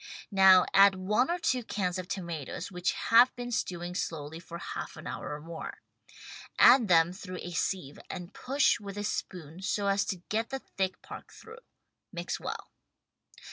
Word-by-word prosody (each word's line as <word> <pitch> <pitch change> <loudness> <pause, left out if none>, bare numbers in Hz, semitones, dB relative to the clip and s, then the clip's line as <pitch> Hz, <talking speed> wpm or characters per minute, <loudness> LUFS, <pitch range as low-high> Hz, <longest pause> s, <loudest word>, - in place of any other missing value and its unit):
Now 190 -2 +7
add 195 0 +7
one 210 - +1
or 345 - +1
two 255 -7 0
cans 185 -4 -2
of 180 - -6
tomatoes 170 -3 -5
which 180 0 -1
have 240 +3 +5
been 245 -1 -6
stewing 175 -5 -3
slowly 160 -2 -4
for 170 0 -9
half - - -6
an - - -10
hour - - -5
or - - -8
more. 165 +1 -8 0.7
Add 245 -2 +7
them 170 -1 +4
through 185 -1 -8
a 175 - -6
sieve 170 -4 -2
and 180 +1 -7
push 270 -1 +2
with 200 -1 -8
a 205 - -3
spoon 175 -5 -5
so 200 +1 -1
as 200 0 +2
to 180 -3 -4
get 225 +2 -1
the 270 - -3
thick 190 -7 -4
part - - -10
through. 450 +1 -13 0.5
Mix - - -4
well. - - -6
190 Hz, 175 wpm, -29 LUFS, 175-215 Hz, 0.7 s, Now